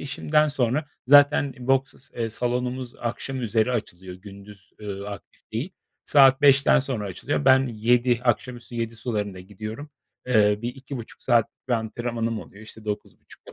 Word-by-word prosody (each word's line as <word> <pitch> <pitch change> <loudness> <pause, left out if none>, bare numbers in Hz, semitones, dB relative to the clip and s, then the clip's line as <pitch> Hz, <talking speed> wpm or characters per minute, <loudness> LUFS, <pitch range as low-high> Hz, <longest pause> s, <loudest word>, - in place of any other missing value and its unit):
işimden 150 +2 +1
sonra 140 +2 0 0.2
zaten 145 0 +6
i 125 - -10
boks 135 0 +1
s - - -10
eee, 115 - 0
salonumuz 125 +2 -2
akşam 130 +2 -4
üzeri 110 +1 +1
açılıyor, 95 -5 -5
gündüz, 100 +1 -14
ııı, 100 -1 -6
aktif 100 -5 -11
değil. 140 - -3 0.3
Saat 135 -1 +5
17.00'dan 140 +1 +6
sonra 130 -7 -3
açılıyor. 75 -5 -3
Ben 130 0 +5
yedi 120 +2 +2
akşam 120 +1 0
üstü 120 0 -13
19.00 115 -1 -3
sularında 105 -4 -3
gidiyorum. 110 +9 -8 0.4
Eee, 105 -4 +3
bir 120 +1 -3
2,5 135 -3 -9
saat 120 -3 +3 0.2
bir - - 0
antrenmanım 115 0 -2
oluyor, 100 +3 -13
işte, 110 0 -13
21.30'da 105 -1 -8
120 Hz, 155 wpm, -24 LUFS, 105-130 Hz, 0.4 s, zaten